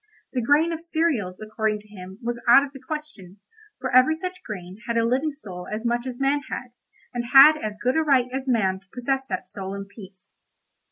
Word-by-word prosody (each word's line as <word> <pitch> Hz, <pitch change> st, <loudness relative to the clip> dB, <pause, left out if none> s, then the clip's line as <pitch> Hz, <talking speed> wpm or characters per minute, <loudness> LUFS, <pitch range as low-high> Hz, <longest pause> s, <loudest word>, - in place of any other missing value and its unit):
The 255 Hz, -, 0 dB
grain 295 Hz, +7 st, +3 dB
of 330 Hz, -, -3 dB
cereals, 315 Hz, -, -1 dB
according 215 Hz, 0 st, -2 dB
to 210 Hz, -, -20 dB
him, 190 Hz, -2 st, -11 dB
was 235 Hz, 0 st, -3 dB
out 270 Hz, +4 st, +7 dB
of 280 Hz, -, -13 dB
the 270 Hz, -, -10 dB
question, 270 Hz, -, -7 dB, 0.4 s
for 255 Hz, -1 st, -2 dB
every 255 Hz, +5 st, +6 dB
such 365 Hz, +2 st, -6 dB
grain 185 Hz, -, -8 dB
had 235 Hz, 0 st, 0 dB
a 230 Hz, -, +3 dB
living 265 Hz, +6 st, +1 dB
soul 190 Hz, -11 st, -9 dB
as 215 Hz, +2 st, -4 dB
much 240 Hz, +2 st, 0 dB
as 245 Hz, -1 st, -6 dB
man 275 Hz, +1 st, +2 dB
had, 250 Hz, -, -5 dB, 0.4 s
and 240 Hz, -1 st, -3 dB
had 275 Hz, +3 st, +10 dB
as 210 Hz, -1 st, -4 dB
good 255 Hz, +1 st, 0 dB
a 320 Hz, -, +3 dB
right 275 Hz, -5 st, +3 dB
as 265 Hz, 0 st, -3 dB
man 195 Hz, -7 st, +1 dB
to 195 Hz, 0 st, -31 dB
possess 265 Hz, +2 st, -2 dB
that 185 Hz, -1 st, -4 dB
soul 190 Hz, +1 st, -6 dB
in 200 Hz, 0 st, -6 dB
peace. 195 Hz, -2 st, -15 dB
240 Hz, 215 wpm, -24 LUFS, 205-275 Hz, 0.4 s, had